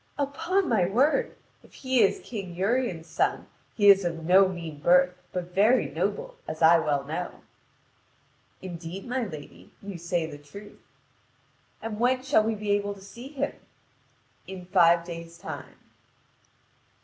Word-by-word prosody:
"Upon 330 +7 0
my 200 -7 +2
word, 260 - +2 0.3
if - - -19
he 260 -2 +1
is 200 - +3
King 195 -7 -6
Urien's 195 -3 0
son 160 -1 -1 0.3
he 205 -2 +3
is 200 -1 +8
of 165 -2 -3
no 190 +3 +6
mean 165 -5 -7
birth, 180 +3 +4 0.2
but 180 -1 -5
very 215 +7 +3
noble, - - -3
as - - -4
I 165 +1 +7
well 145 -3 0
know." 160 +5 -5 1.2
"Indeed, 175 +1 -7
my 250 +1 -1
lady, 155 -7 -11
you 195 -3 -8
say 170 0 -1
the 145 -2 -9
truth." 200 +9 -13 1.0
"And 220 -1 -5
when 255 +2 +2
shall 265 -4 +4
we 220 0 0
be 210 0 -3
able 205 0 0
to 195 - -15
see 235 +6 -10
him?" 280 -1 -3 0.9
"In 185 -1 -8
five 170 -2 +4
days' 170 -1 -8
time." - - -8
190 Hz, 150 wpm, -27 LUFS, 170-230 Hz, 1.2 s, is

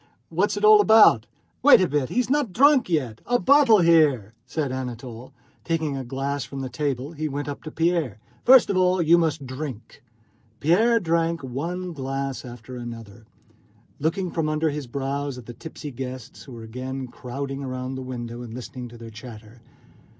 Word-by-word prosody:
What's 190 +5 0
it 205 - +1
all 215 -1 +8
about?" 210 - +6 0.3
"Wait 285 +2 +8
a 185 - +2
bit, 145 -3 -1
he - - 0
is 250 - +1
not 285 -5 0
drunk 275 -1 +4
yet! 130 -10 -1
A 245 - +3
bottle 260 -6 +5
here," 150 - +3
said 145 -1 -2
Anatole, 125 -2 -6
and 130 - -19 0.3
taking 160 -4 -1
a 135 - -4
glass 135 +2 -3
from 135 0 -7
the 130 - -4
table 140 -1 -3
he 155 -1 -4
went 145 +1 -4
up 145 - -6
to - - -4
Pierre. 165 - 0 0.3
"First 255 -4 +7
of 190 - 0
all 185 0 +3
you 170 +1 +5
must 155 -4 -1
drink!" 130 -3 -7 0.6
Pierre 220 +10 +3
drank 165 -3 0
one 170 +8 -4
glass 135 -1 -4
after 120 0 -10
another, 115 -3 -9 0.7
looking 170 +4 -1
from 160 -2 -1
under 155 0 0
his 145 -3 -5
brows 140 +1 -3
at 125 - -10
the 120 - -9
tipsy 150 +1 -9
guests 125 -4 -8
who 130 - -11
were 115 -1 -9
again 130 +4 -5
crowding 135 +3 -6
round 130 0 -4
the 130 - -5
window, 120 -2 -6
and 120 -2 -8
listening 125 0 -7
to 120 0 -13
their 115 -1 -10
chatter. 110 0 -12
140 Hz, 185 wpm, -24 LUFS, 125-165 Hz, 0.7 s, all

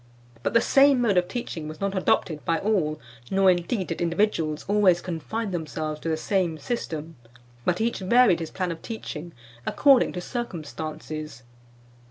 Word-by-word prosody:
But - - -2
the 230 - +7
same 275 0 +5
mode 220 -6 +2
of 180 0 +3
teaching 180 -7 -5
was 155 0 -8
not 200 0 -1
adopted 160 -4 +1
by 165 - +1
all, 165 -6 0 0.3
nor, 195 -1 +5
indeed, 180 +3 -1
did 165 - -4
individuals 170 -3 0
always 200 -4 +4
confine 185 +6 -4
themselves 155 -2 -3
to 165 - -4
the 160 - 0
same 175 -1 0
system, 160 - -4 0.5
but 180 0 +1
each 230 +1 0
varied 200 -1 +4
his 165 -2 -4
plan 185 -2 -2
of 165 - -7
teaching 175 -7 -6 0.3
according 270 - +4
to 180 - -4
circumstances. 155 - -6
175 Hz, 160 wpm, -25 LUFS, 160-210 Hz, 0.5 s, the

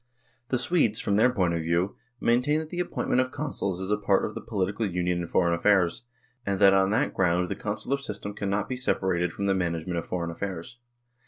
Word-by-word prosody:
The 130 - +1
Swedes, 120 -4 +2
from 100 - 0
their 125 +4 +5
point 90 -8 +1
of 85 - -1
view, 85 +4 0 0.2
maintain 125 +6 +2
that 155 0 -7
the 175 - -4
appointment 175 -7 0
of 130 - -2
Consuls 130 -11 -3
is 95 +2 -3
a 105 - +3
part 100 -2 +2
of 110 - -5
the - - -6
political 100 +1 -2
union 90 -1 -1
in 85 - -4
foreign 85 0 +2
affairs, 90 +3 +2 0.4
and 100 -3 -1
that 100 -1 +7
on 95 0 +4
that 105 - +1
ground 90 -1 +1
the - - -2
Consular 110 +6 -2
system 105 -6 -6
cannot 100 0 -1
be 130 - -3
separated 90 -8 0
from 100 - -4
the 100 - +3
management 85 -1 -1
of 85 - -7
foreign 85 -2 -2
affairs. 95 +5 -6
100 Hz, 215 wpm, -27 LUFS, 90-115 Hz, 0.4 s, that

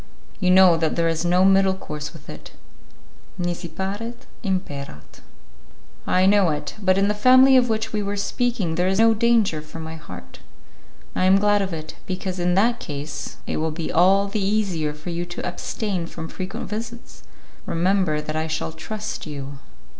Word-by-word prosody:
You 185 -3 +1
know 185 -2 +7
that 160 -1 0
there 170 -1 +1
is 165 0 0
no 180 +2 +3
middle 195 0 +4
course 150 -5 -6
with 160 -4 -15
it: - - -10 0.8
'nisi 175 -1 -3
paret, 205 +8 -5 0.2
imperat'." 145 - -5 0.9
"I 185 +1 +3
know 200 -2 +4
it, 150 -1 -3
but 185 -1 +3
in 195 +1 +3
the 210 - +2
family 255 +5 +6
of 250 -2 +4
which 220 0 -1
we 210 - 0
were 200 0 -3
speaking 210 -4 -1
there 180 +2 +1
is 190 0 +1
no 225 +1 +5
danger 220 -8 +2
for 155 +2 -10
my 160 0 -6
heart." 155 - -11 0.8
"I 185 - +1
am 190 +1 +6
glad 205 0 +3
of 190 -1 -2
it, 155 -1 -7
because 185 0 -4
in 175 0 +1
that 235 +5 +3
case 145 -1 -6
it - - -3
will 160 +1 0
be 160 +1 -4
all 195 +4 +4
the 200 0 -2
easier 190 -7 0
for 150 +4 -7
you 170 +1 -2
to 175 - -5
abstain 180 0 -3
from 160 -1 -7
frequent 185 0 -6
visits. 230 +3 -7 0.5
Remember 170 -3 +1
that 155 0 -5
I 160 0 -1
shall 160 0 -3
trust 210 +5 -6
you." 140 -2 -7
185 Hz, 180 wpm, -23 LUFS, 160-205 Hz, 0.9 s, know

